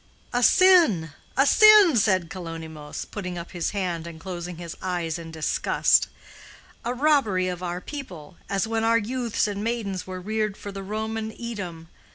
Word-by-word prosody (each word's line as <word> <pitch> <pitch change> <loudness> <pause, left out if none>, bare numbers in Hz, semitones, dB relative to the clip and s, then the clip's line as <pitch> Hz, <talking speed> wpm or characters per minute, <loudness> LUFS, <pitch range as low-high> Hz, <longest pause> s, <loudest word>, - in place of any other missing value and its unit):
'" - - -28
"A 245 - +1
sin, 320 - +5 0.3
a 275 - +5
sin!" 420 - +7
said 190 -6 +2
Kalonymos, 160 -4 -7
putting 180 -4 -5
up 170 0 -7
his 175 -2 -2
hand 175 -5 -3
and 165 -1 -9
closing 175 -1 -6
his 170 -1 -7
eyes 175 -3 -2
in 165 -1 -8
disgust. 160 -1 +2 0.8
"A 240 - -2
robbery 250 -9 +2
of 180 -1 -4
our 175 0 -3
people—as 195 - -5
when 225 0 -1
our 230 0 +4
youths 235 0 -1
and 205 0 -4
maidens 215 -6 -3
were 185 0 -6
reared 215 +1 -2
for 205 - -7
the 195 0 -7
Roman 220 +2 -4
Edom. 185 -9 -6
195 Hz, 165 wpm, -25 LUFS, 175-230 Hz, 0.8 s, sin